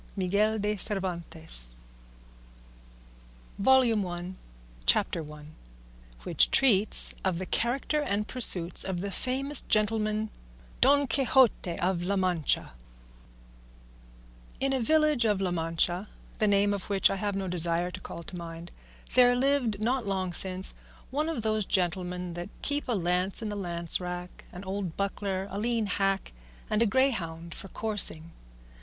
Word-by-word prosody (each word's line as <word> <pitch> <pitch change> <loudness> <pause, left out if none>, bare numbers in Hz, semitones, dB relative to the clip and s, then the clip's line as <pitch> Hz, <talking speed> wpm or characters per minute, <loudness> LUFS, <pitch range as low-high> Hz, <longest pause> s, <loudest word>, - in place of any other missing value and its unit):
Miguel 200 +3 +1
de 210 0 -1
Cervantes 170 - -5 1.9
CHAPTER 175 - 0
I. 150 -1 -12 0.8
WHICH - - +3
TREATS 215 -6 +4
OF 185 -3 0
THE 185 - -4
CHARACTER 265 +9 0
AND 210 -6 -1
PURSUITS 180 -9 +4
OF 185 -2 -3
THE 200 +1 -4
FAMOUS 265 +6 +1
GENTLEMAN 215 0 0 0.5
DON 285 +2 +5
QUIXOTE 255 -8 +2
OF 180 -1 0
LA 190 +3 -1
MANCHA 180 -5 0 1.9
In 270 0 0
a 265 - 0
village 305 -1 +2
of 210 -3 +1
La 190 -2 -1
Mancha, 175 +3 -1 0.3
the 215 - +2
name 205 0 +3
of 200 -1 -6
which 195 -2 +3
I 195 - -2
have 205 0 -2
no 195 -1 -3
desire 175 0 +2
to 185 - -7
call 170 -2 -9
to 180 - -8
mind, 170 0 -8 0.4
there 245 -1 +5
lived 250 -5 +1
not 240 0 0
long 190 -2 -2
since 185 +1 +4 0.4
one 300 +4 -1
of 255 -9 -3
those 215 -1 0
gentlemen 180 -1 -1
that 175 +2 -6
keep 290 0 -1
a 245 - 0
lance 180 +2 +1
in 215 - -3
the 205 - -4
lance 170 -4 -1
rack, 180 0 -7
an 180 +1 -9
old 190 -3 -5
buckler, 195 -1 -3
a 200 - -4
lean 230 0 0
hack, 195 - -1 0.4
and 215 +1 +1
a 230 - +4
greyhound 170 -10 -1
for 195 - -8
coursing. 190 -6 +1
195 Hz, 140 wpm, -28 LUFS, 175-225 Hz, 1.9 s, DON